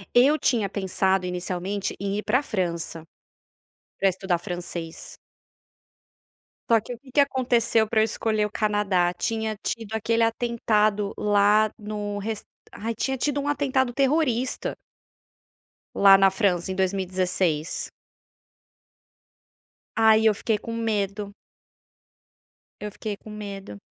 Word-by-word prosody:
Eu 280 +6 +5
tinha 225 -6 +1
pensado, 190 -1 0
inicialmente, 180 +2 -3
em 200 +1 -2
ir 210 - -3
pra 250 +5 +2
França. 170 - -3 1.0
Pra 195 - +4
estudar 185 -1 -1
francês. 175 -2 -6 1.5
Só 230 - +6
que 225 +3 -7
o 235 - -11
que 260 +1 -17
que 285 - +2
aconteceu 240 -5 +2
pra 220 0 +1
eu - - +5
escolher 215 -1 0
o 210 - -5
Canadá. 205 -5 +1
Tinha 220 +3 -2
tido 220 0 -4
aquele 230 +1 +1
atentado 215 -3 +1
lá 210 +1 +3
no 205 -1 -4
res 215 +1 -4 0.3
ai 230 +2 -4
tinha 265 +4 -2
tido 285 +2 0
um 285 - -4
atentado 265 -3 +1
terrorista. 260 -2 0 1.2
Lá 195 -1 +8
na 195 0 +6
França 190 -2 0
em - - -3
2016. 185 -4 -1 2.0
Aí, 220 0 +5
eu 220 - +6
fiquei 220 +1 -1
com 230 +2 -7
medo. 205 -3 -2 1.5
Eu 210 0 -5
fiquei 210 0 -5
com 215 - -14
medo. 200 - -8
210 Hz, 125 wpm, -25 LUFS, 195-230 Hz, 2.0 s, Lá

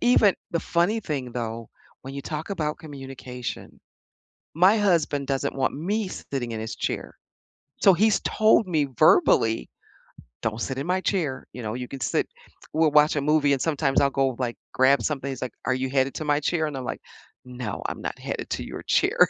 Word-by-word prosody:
even 220 -5 +5 0.2
the 170 - 0
funny 175 +7 +1
thing, 135 - -4
though, 115 -1 -4 0.3
when 135 +1 -8
you 140 - -5
talk 155 +5 -5
about 155 -6 -2
communication, 135 -5 -7 0.7
my 185 +7 +5
husband 165 -8 +1
doesn't 140 +1 -1
want 135 -1 0
me 200 +8 -1
sitting 135 -9 -5
in 110 - -4
his 110 0 -5
chair, - - -4 0.6
so 195 - +7
he's 215 +4 +3
told 220 -1 +3
me 155 -5 +2
verbally, 115 0 +4 0.7
"Don't 110 +1 -2
sit 135 +2 -3
in 140 - -3
my 185 +1 +1
chair." 165 -9 -1
You 125 - -7
know, 110 -1 -3
"You 125 0 -5
can 135 - -8
sit" - - 0 0.5
we'll 160 -1 +4
watch 150 +1 +5
a - - +2
movie 145 0 +3
and 135 - -2
sometimes 145 -4 +1
I'll 140 - +3
go, 135 -2 0
like, 120 -2 -2 0.2
grab 135 +2 +4
something, 140 -2 -2
he's 130 - -6
like, 130 - -4
"Are 130 - +1
you 130 +1 -1
headed 135 0 +1
to 155 - -3
my 145 0 +2
chair?" 160 +1 0
and 150 -2 -4
I'm 130 - -5
like, - - -4 0.5
"No, 125 -4 -5
I'm - - -5
not - - -4
headed - - -5
to - - -2
your - - -7
chair." - - +2
140 Hz, 195 wpm, -25 LUFS, 130-165 Hz, 0.7 s, so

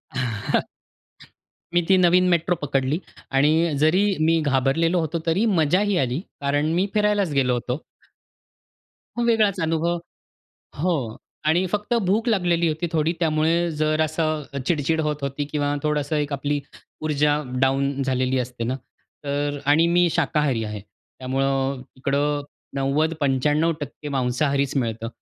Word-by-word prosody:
अ, - - -3
ह 110 -4 0 1.1
मी 175 - +4
ती 190 - +6
नवीन 180 0 +4
मेट्रो 175 0 +2
पकडली 135 +3 0 0.3
आणि 155 +4 +3
जरी 180 +6 +4 0.2
मी 165 0 +3
घाबरलेलो 145 +6 +2
होतो, 165 +1 -2
तरी 180 +7 +2
मजाही 185 +6 +2
आली; 130 -1 0 0.2
कारण 145 +2 +1
मी 185 +4 +1
फिरायलाच 210 -5 +2
गेलो 130 -3 +2
होतो. 125 +1 -2 1.4
मग 240 - +1
वेगळाच 215 -4 +3
अनुभव. 165 +1 0 0.8
हो. 140 -9 -1 0.3
आणि 170 +4 +3
फक्त 210 +5 -2
भूक 220 +6 +1
लागलेली 175 -5 +2
होती 160 +2 -1
थोडी, 160 0 +1
त्यामुळे 165 +1 +2
जरा 155 0 +2
असं 155 -3 -2
चिडचिड 160 0 +1
होत 150 -1 0
होती 140 +1 -3
किंवा 145 -1 0
थोडंसं 150 0 0
एक 145 -1 -1
आपली 145 +1 -1 0.4
ऊर्जा 150 -1 +1 0.2
डाउन 135 +1 +1
झालेली 130 0 0
असते 125 -1 -4
न. 125 +3 -1 0.5
तर 145 0 -1
आणि 150 +4 +4
मी 175 0 +4
शाकाहारी 150 -7 +1
आहे. 105 -1 -5 0.4
त्यामुळं 135 0 -1
इकडं 145 +2 0 0.3
90%-95% 150 +1 0
मांसाहारीच 135 +2 0
मिळतं. 115 -2 -2
150 Hz, 130 wpm, -23 LUFS, 135-165 Hz, 1.4 s, ती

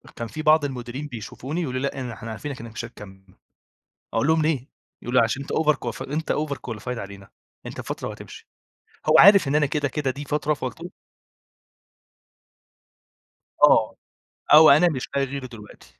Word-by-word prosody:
كان 115 - -5
في 155 - -6
بعض 155 -1 +4
المديرين 130 +1 -6
بيشوفوني 130 +5 -6
ويقولوا 130 -6 -3
لي 140 - 0
"لأ 140 - -6
إن 125 -1 -5
إحنا 115 0 -8
عارفينك 135 +4 -6
إنّك 115 0 -9
مش 115 +2 -6
هتكَمّل." 100 -5 -13 0.9
أقول 115 +4 +1
لهم: 160 0 +3
"ليه؟" 150 -4 -1 0.3
يقولوا 125 0 +2
"عشان 115 +4 -1
أنت 140 - -7
overqualif 150 -8 0
أنت 155 +1 -1
overqualified 125 -5 -4
علينا، 100 -1 -9 0.4
أنت - - -7
بفترة - - -5
وهتمشي. - - -11 0.6
هو 155 - +5
عارف 200 -4 +8
إن 140 - 0
أنا 150 -1 +3
كده 145 0 -1
كده 145 -1 -2
دي 145 +3 -8
فترة 150 +1 0
فقُلتل 150 +5 -6 2.7
آه، - - +5 0.6
أو 155 +1 +9
أنا 155 +5 +6
مش 130 -6 -4
لاقي 140 0 +2
غيره 135 0 -6
دلوقتي. 105 - -15
135 Hz, 160 wpm, -23 LUFS, 115-150 Hz, 2.7 s, أو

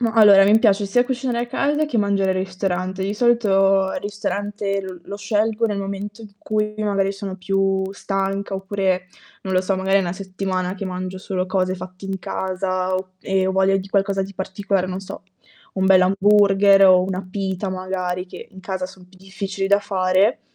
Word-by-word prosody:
Ma, 230 -2 +1
allora, 205 -3 +7
mi 210 +2 +5
piace 205 -3 +3
sia 245 +5 +2
cucinare 255 -2 -2
a - - -12
casa 295 +5 0
che 270 -6 -3
mangiare 200 -2 +1
al - - -3
ristorante. 185 0 -3
Di 200 +2 -2
solito 195 -5 +3
il 280 - -3
ristorante 205 -1 -3 0.2
lo 200 - -6
scelgo 215 +2 0
nel 205 -3 0
momento 200 +2 -5
in 210 -2 -12
cui 210 0 -2
magari 200 -2 0
sono 195 -1 -6
più 195 0 0
stanca 195 0 -3
oppure, 190 -2 -1 0.3
non 190 -1 -3
lo 185 - +3
so, 195 +1 0
magari 190 +1 +1
è - - +4
una 175 -2 -2
settimana 185 -1 -3
che 200 - -6
mangio 185 0 -5
solo 185 -1 -3
cose 185 -1 0
fatte 185 +1 -10
in 195 0 -3
casa 185 0 -2
o 185 0 -4
e 190 -1 0
ho 190 - 0
voglia 190 0 +3
di 195 +1 -7
qualcosa 195 0 +1
di 195 0 -8
particolare, 195 0 -2
non 185 +1 -4
so, 195 - -9 0.5
un 190 -1 0
bell'hamburger 195 +1 +5
o 180 -1 +6
una 185 0 -4
pita 190 0 -3
magari, 185 -1 -3
che - - -10
in 190 - -13
casa 190 -1 -4
son 185 -1 -11
più 185 - -21
difficili 195 0 -4
da 200 +1 +4
fare. 190 +4 +1
195 Hz, 190 wpm, -21 LUFS, 185-205 Hz, 0.5 s, allora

